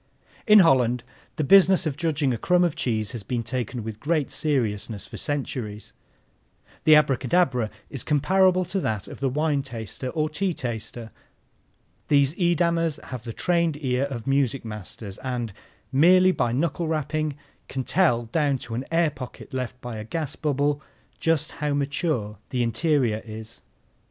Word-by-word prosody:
In 215 -1 +8
Holland 125 -7 +3 0.3
the 155 - -1
business 190 +3 +6
of 150 -4 -1
judging 150 -4 0
a - - -2
crumb 180 0 +3
of 170 -3 +1
cheese 110 -8 -1
has 120 -4 -5
been 115 +4 -3
taken 120 0 -3
with 110 -1 -6
great 155 0 0
seriousness 115 -8 -1
for - - -9
centuries. 125 -8 -4 0.9
The 155 - +8
abracadabra 135 -4 +2 0.2
is 135 - -3
comparable 185 +5 +3
to 185 +3 -2
that 110 - -2
of - - -9
the 135 - +1
wine 150 +1 +1
taster 125 -1 -6
or 155 +4 0
tea 175 +3 -2
taster. 115 -2 -5 1.0
These 140 -1 +4
Edamers 170 -2 +1
have 125 -2 -6
the 115 - -4
trained 170 +3 +1
ear 130 +1 +1
of 125 -5 -6
music 135 -2 +1
masters 105 -1 -7
and, 120 -5 -3 0.4
merely 185 +7 +6
by 120 -9 0
knuckle 160 +5 -1
rapping, 155 -1 -1 0.3
can 130 -1 -3
tell 140 -8 +2
down 140 +3 +1
to 115 - -8
an 125 +4 -3
air 165 -2 +3
pocket 130 -2 -10
left 125 -1 -4
by 120 -2 -6
a 110 - -5
gas 150 +6 -3
bubble 145 0 0 0.4
just 165 -3 +1
how 150 -1 -2
mature 140 - -1
the 125 -2 0
interior 120 -2 +1
is. 110 0 -9
140 Hz, 155 wpm, -25 LUFS, 120-160 Hz, 1.0 s, In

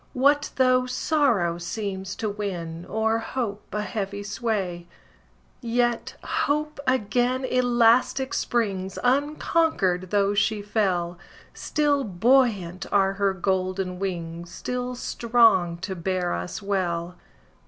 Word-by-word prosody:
What 285 +3 +3
though 255 -1 +3
sorrow 250 - +1
seems 190 +1 -4
to 220 - -3
win, 175 -5 -4
O'er 220 +1 +1
hope, 225 -3 -4
a 210 0 -2
heavy 200 0 -4
sway? 200 -5 -2 0.7
Yet 240 0 0
Hope 300 +1 -1
again 255 +1 +1
elastic 250 +1 +3
springs, 195 -5 -1
Unconquered, 265 - +1
though 200 0 +2
she 205 0 +1
fell; 180 -5 0 0.3
Still 290 -2 +1
buoyant 205 -3 +2
are 195 -1 +3
her 195 -1 0
golden 185 0 -1
wings, 170 -3 -4
Still 250 +6 -4
strong 225 -9 +3
to 190 0 -3
bear 180 0 -1
us 90 - -5
well. 180 -3 -1
205 Hz, 110 wpm, -25 LUFS, 185-245 Hz, 0.7 s, What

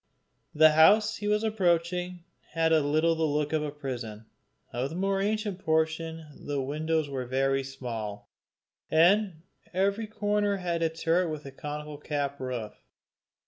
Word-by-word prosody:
The 155 +1 +7
house 210 +8 +5
he 205 - -4
was 210 +1 +2
approaching 180 -3 0 0.3
had 165 0 +2
a 160 - +6
little 155 +3 +2
the 160 - -4
look 150 -1 0
of 155 - +2
a 150 - -2
prison. 125 -7 -6 0.5
Of 125 +3 -1
the 160 - -7
more 195 +1 0
ancient 210 -2 -1
portion 160 0 0 0.2
the 145 -1 -2
windows 155 +3 -1
were 130 -3 -4
very 135 +1 +1
small, 115 -6 -6 0.6
and 175 +1 +3 0.3
every 200 +4 +1
corner 205 -1 0
had 175 -2 -2
a 165 - +2
turret 165 +2 +1
with 155 -2 -6
a 135 - -7
conical 150 +1 -6
cap 145 -2 -3
roof. 125 -5 -4
160 Hz, 150 wpm, -28 LUFS, 145-180 Hz, 0.6 s, The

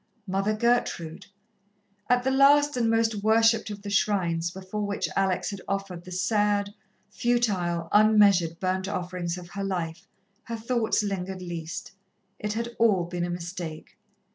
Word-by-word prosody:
Mother 195 +2 0
Gertrude. 215 -8 0 0.8
At 245 0 +3
the 265 - +1
last 290 +2 +5
and 235 -2 +1
most 225 0 +2
worshipped 225 +1 +3
of 205 -1 -7
the 205 - -5
shrines 175 -5 +1
before 190 +3 -6
which 200 0 -2
Alex 190 -1 0
had 200 -2 -7
offered 195 -3 -3
the 185 - -10
sad, 205 +1 +1 0.4
futile, 190 -9 0
unmeasured 205 -6 +5
burnt 190 0 -1
offerings 180 -3 -3
of 175 -1 -10
her 200 +2 -5
life, 170 -4 -3 0.4
her 230 -1 -4
thoughts 230 -1 0
lingered 190 -2 -4
least. 170 -2 -6 0.5
It 210 0 -2
had 230 +2 -2
all 210 -6 +4
been 175 0 -3
a - - -4
mistake. 170 -2 -6
195 Hz, 145 wpm, -26 LUFS, 175-220 Hz, 0.8 s, last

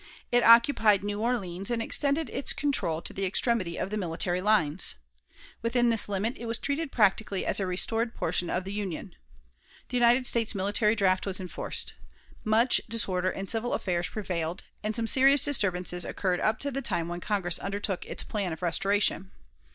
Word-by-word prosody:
It 245 0 +4
occupied 230 -4 +5
New 205 0 -3
Orleans, 195 -6 -2
and 235 -1 -1
extended 280 +5 0
its 270 - -1
control 170 - 0
to - - -4
the 195 - -4
extremity 190 -2 0
of 195 - -3
the 215 - -2
military 175 -1 -2
lines. 185 - +1 0.7
Within 240 +1 +1
this 225 -2 +2
limit 205 +5 -2
it 235 - -7
was 230 +1 -1
treated 285 +1 -3
practically 205 -2 +1
as - - +1
a 195 - -1
restored 225 +6 0
portion 175 +1 -1
of 180 - -1
the 195 +2 -6
Union. 195 -3 -5 0.8
The 250 - -1
United 245 +1 +4
States 230 -2 +1
military 205 +3 +1
draft 190 -2 +1
was 190 0 +2
enforced. 185 -2 -4 0.5
Much 225 +3 +3
disorder 185 -5 +1
in 195 +1 -5
civil 230 +4 0
affairs 175 -2 -2
prevailed, 180 -4 -4 0.2
and 215 0 -2
some 230 - +2
serious 270 +3 +6
disturbances 180 -9 0
occurred 180 -2 -2
up 220 +1 +1
to 280 - 0
the 275 +1 -3
time 170 -10 -2
when 175 0 -5
Congress 180 -3 -2
undertook 200 -1 -3
its - - -1
plan 200 -4 -3
of 160 +2 -7
restoration. 195 +2 +1
205 Hz, 175 wpm, -27 LUFS, 185-235 Hz, 0.8 s, serious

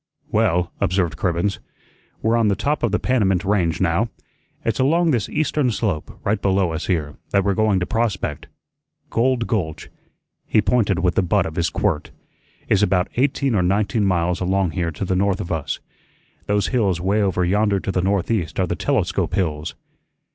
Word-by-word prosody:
"Well," 90 +1 +2
observed 90 -4 +1
Cribbens, 90 +5 -1 0.6
"we're 115 +1 +3
on 115 -2 +3
the 100 - +2
top 145 +9 -1
of 120 - +1
the 105 - +2
Panamint 100 -7 +1
Range 90 -5 +1
now. 95 +6 +1 0.6
It's 115 +1 0
along 165 +5 +3
this 115 -8 0
eastern 150 -3 +1
slope, 100 -8 -2
right 100 0 0
below 95 -3 +2
us 80 0 -4
here, 75 -5 -1
that 100 - +2
we're 100 0 +1
going 105 -1 +2
to - - +1
prospect. 105 -10 -2 0.6
Gold 120 0 +1
Gulch" 90 -11 -3 0.6
he - - +3
pointed 105 -5 +2
with 90 0 +1
the 95 - +2
butt 90 - +1
of 80 - -5
his 85 0 +1
quirt - - -1 0.6
"is - - +3
about 90 0 +2
eighteen 135 0 +1
or 100 - +2
nineteen 100 +4 +1
miles 90 -2 +1
along 95 -1 +1
here 85 0 -1
to 80 +5 -4
the 95 - 0
north 95 0 +1
of 90 -4 -5
us. 75 -3 -2 0.7
Those 105 -1 +1
hills 100 -9 +1
way 100 +4 +1
over 90 -3 +1
yonder 100 +2 +2
to 95 - -3
the 90 - 0
northeast 95 -3 0
are 95 - +3
the - - -2
Telescope - - 0
hills." 80 -4 -2
95 Hz, 180 wpm, -21 LUFS, 90-110 Hz, 0.7 s, we're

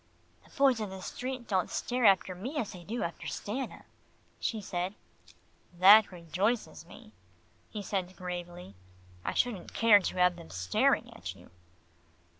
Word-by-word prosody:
"The - - -21
boys 270 -4 +4
in 210 -2 -3
the 190 0 -8
street 255 +5 -5
don't 185 -3 0
stare 245 -1 -1
after 190 -2 +4
me 245 - -6
as 230 -8 -2
they 180 -2 -10
do 230 +7 -3
after 170 -1 -5
Stanna," 255 +6 -5 0.6
she 225 - -2
said. 185 -1 -3 0.8
"That 200 +4 +8
rejoices 185 +7 -2
me," - - -14 0.6
he 210 -2 -6
said 185 -2 -3
gravely. 175 - -7 0.5
"I - - -3
shouldn't 240 -7 -1
care 225 -3 +7
to 185 - -4
have 180 -1 +3
them 170 - -12
staring 90 0 +1
at - - -7
you." - - -17
195 Hz, 150 wpm, -30 LUFS, 180-230 Hz, 0.8 s, That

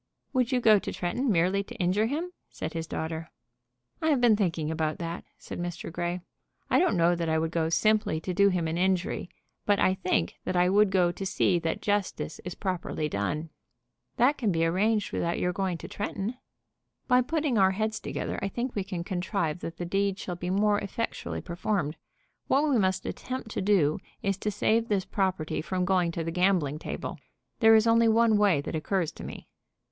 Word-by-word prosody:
"Would 255 -1 +1
you 255 - +3
go 215 -3 +6
to - - -5
Tretton 245 +10 -1
merely 185 +2 +2
to 240 - -11
injure 200 +2 +1
him?" 320 +8 -3 0.2
said - - -5
his 165 -1 -4
daughter. 160 0 -4 0.7
"I 315 - +1
have 285 -4 +3
been 240 -3 +5
thinking 165 -6 -1
about 155 -1 -1
that," 170 0 -5
said - - -8
Mr. 175 -1 -5
Grey. 175 +1 -2 0.5
"I - - +5
don't 355 - +2
know 170 +1 +4
that 170 -1 -1
I 160 - +2
would 160 0 -1
go 165 -1 0
simply 215 -2 +2
to 180 - -3
do 200 +2 +5
him 180 -3 0
an 165 +2 -2
injury; 185 -1 0 0.3
but 205 -1 +3
I 185 - +4
think 185 - -1
that - - -2
I 180 0 +4
would 205 +1 +4
go 180 -2 +3
to 180 - -7
see 185 -1 +2
that 165 -1 -3
justice 205 -5 -1
is 180 -1 -6
properly 180 -5 -2
done." 150 +9 -2 0.7
"That 265 +4 +3
can 220 -6 +1
be 165 -1 +1
arranged 205 +5 +1
without 170 0 0
your 180 0 0
going 185 -2 -1
to - - -8
Tretton." 205 +3 -4 0.7
"By 250 0 +5
putting 290 -3 0
our 190 -1 +6
heads 215 +2 -1
together - - -4
I 195 - 0
think 240 +5 -3
we 200 - -1
can 185 -3 -4
contrive 175 -2 -2
that 165 0 -6
the 175 - -4
deed 195 +2 0
shall 180 -3 -5
be 175 +1 -4
more 205 +2 +3
effectually 215 +3 -4
performed. 170 -3 -2 0.5
What 285 +3 +3
we 270 -6 +3
must 190 -1 +1
attempt 255 -3 -5
to - - -2
do 185 -7 +3 0.2
is 195 0 +1
to 210 - -1
save 225 +2 +1
this 200 -4 0
property 185 -8 -1
from 180 +2 -1
going 180 -2 +2
to 165 - -2
the 165 - -3
gambling 175 -5 +1
table. - - -5 0.4
There 225 -1 +7
is 220 0 +5
only 230 0 +5
one 225 0 +4
way 195 -9 +4
that - - -6
occurs 170 +1 -1
to - - -11
me." - - -8
190 Hz, 205 wpm, -28 LUFS, 170-215 Hz, 0.7 s, There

